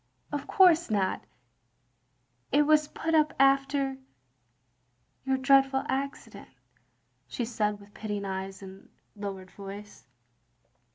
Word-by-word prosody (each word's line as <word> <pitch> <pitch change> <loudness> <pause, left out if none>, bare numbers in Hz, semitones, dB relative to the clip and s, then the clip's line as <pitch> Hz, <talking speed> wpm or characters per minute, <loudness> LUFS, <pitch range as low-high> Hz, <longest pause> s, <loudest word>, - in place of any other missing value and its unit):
"Of 290 -2 -4
course 345 -4 +5
not. 195 -3 -1 1.3
It 290 +2 +4
was 305 0 +3
put 325 +2 -3
up 305 -1 +3
after 275 0 +2 0.6
— 125 - -37
^your 265 0 +1
dreadful 270 0 +4
accident," 275 +1 -4 0.8
she 240 - -3
said 210 -3 -1
with 205 0 -17
pitying 205 -2 -4
eyes 190 0 -5
and 190 0 -12 0.3
lowered 195 -2 -7
voice. 200 -4 -10
235 Hz, 110 wpm, -28 LUFS, 195-275 Hz, 1.3 s, course